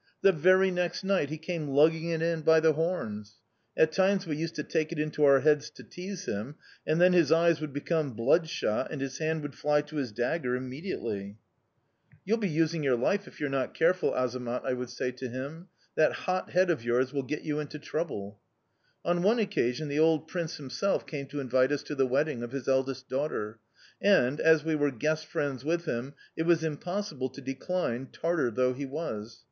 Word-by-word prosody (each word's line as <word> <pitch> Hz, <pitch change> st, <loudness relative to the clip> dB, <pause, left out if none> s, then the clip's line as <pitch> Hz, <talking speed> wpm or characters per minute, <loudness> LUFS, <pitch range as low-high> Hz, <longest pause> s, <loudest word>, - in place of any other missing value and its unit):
The 195 Hz, -, +7 dB
very 185 Hz, +3 st, +4 dB
next 180 Hz, 0 st, -1 dB
night 190 Hz, -7 st, +1 dB
he 155 Hz, -, -4 dB
came 160 Hz, -1 st, -4 dB
lugging 160 Hz, +4 st, +3 dB
it 165 Hz, -1 st, -1 dB
in 165 Hz, -1 st, 0 dB
by 160 Hz, +1 st, +6 dB
the 160 Hz, 0 st, +4 dB
horns! 110 Hz, -, -3 dB, 0.4 s
At 160 Hz, -, +5 dB
times 190 Hz, +2 st, +2 dB
we 155 Hz, -3 st, -2 dB
used 165 Hz, +2 st, -3 dB
to 150 Hz, -, -3 dB
take 160 Hz, 0 st, -1 dB
it 170 Hz, -, -4 dB
into 150 Hz, 0 st, -1 dB
our 140 Hz, -1 st, +6 dB
heads 150 Hz, -1 st, +3 dB
to -, -, -14 dB
tease 185 Hz, +1 st, -7 dB
him, 110 Hz, +8 st, -4 dB, 0.3 s
and 155 Hz, +2 st, +2 dB
then 180 Hz, +1 st, +6 dB
his 170 Hz, -4 st, +4 dB
eyes 165 Hz, 0 st, +4 dB
would 155 Hz, -2 st, -4 dB
become 145 Hz, 0 st, -1 dB
bloodshot 145 Hz, 0 st, +1 dB
and 150 Hz, -, -5 dB
his 135 Hz, 0 st, -4 dB
hand 160 Hz, -1 st, -1 dB
would 145 Hz, -2 st, -5 dB
fly 150 Hz, +3 st, +2 dB
to 150 Hz, +1 st, -9 dB
his 130 Hz, -6 st, -2 dB
dagger 125 Hz, +3 st, -1 dB
immediately. 125 Hz, -, -5 dB, 0.9 s
"'You'll 225 Hz, +4 st, +1 dB
be 205 Hz, -3 st, 0 dB
losing 165 Hz, +1 st, +1 dB
your 135 Hz, -3 st, +3 dB
life 195 Hz, +12 st, 0 dB
if -, -, -14 dB
you 150 Hz, -, -1 dB
are -, -, -1 dB
not 135 Hz, -1 st, -2 dB
careful, 180 Hz, +3 st, +3 dB
Azamat,' 125 Hz, -1 st, -2 dB
I -, -, 0 dB
would 125 Hz, -1 st, -4 dB
say 125 Hz, +1 st, -3 dB
to 125 Hz, +1 st, -6 dB
him. 140 Hz, +8 st, -6 dB, 0.3 s
'That 155 Hz, -, +3 dB
hot 185 Hz, 0 st, -2 dB
head 185 Hz, 0 st, +3 dB
of 150 Hz, -9 st, -2 dB
yours 125 Hz, +3 st, +1 dB
will 140 Hz, -, 0 dB
get 145 Hz, +3 st, -4 dB
you 150 Hz, -1 st, -2 dB
into 150 Hz, 0 st, -5 dB
trouble.' 130 Hz, -10 st, -4 dB, 0.7 s
"On 175 Hz, 0 st, +1 dB
one 210 Hz, +6 st, +4 dB
occasion, 155 Hz, -, 0 dB
the 145 Hz, +1 st, -1 dB
old 160 Hz, 0 st, +3 dB
prince 170 Hz, -2 st, -4 dB
himself 140 Hz, +7 st, -1 dB
came 140 Hz, -3 st, -5 dB
to 145 Hz, -, -5 dB
invite 130 Hz, 0 st, +2 dB
us 145 Hz, 0 st, -1 dB
to 150 Hz, -, -6 dB
the 135 Hz, -2 st, +2 dB
wedding 135 Hz, 0 st, 0 dB
of 120 Hz, +1 st, -6 dB
his 135 Hz, -3 st, -5 dB
eldest 135 Hz, 0 st, 0 dB
daughter; 125 Hz, -6 st, -3 dB, 0.4 s
and, 145 Hz, -9 st, +4 dB
as 160 Hz, -2 st, +5 dB
we 160 Hz, 0 st, 0 dB
were 145 Hz, -1 st, +2 dB
guest 155 Hz, +5 st, -1 dB
friends 145 Hz, -6 st, -2 dB
with 170 Hz, +3 st, -1 dB
him, 130 Hz, 0 st, -3 dB, 0.2 s
it 160 Hz, +1 st, -2 dB
was 170 Hz, -2 st, +4 dB
impossible 160 Hz, -3 st, -3 dB
to 130 Hz, -, -11 dB
decline, 135 Hz, -1 st, -3 dB
Tartar 165 Hz, -6 st, 0 dB
though 125 Hz, +3 st, +1 dB
he 140 Hz, +2 st, -5 dB
was. 120 Hz, -7 st, -5 dB
150 Hz, 205 wpm, -29 LUFS, 130-165 Hz, 0.9 s, The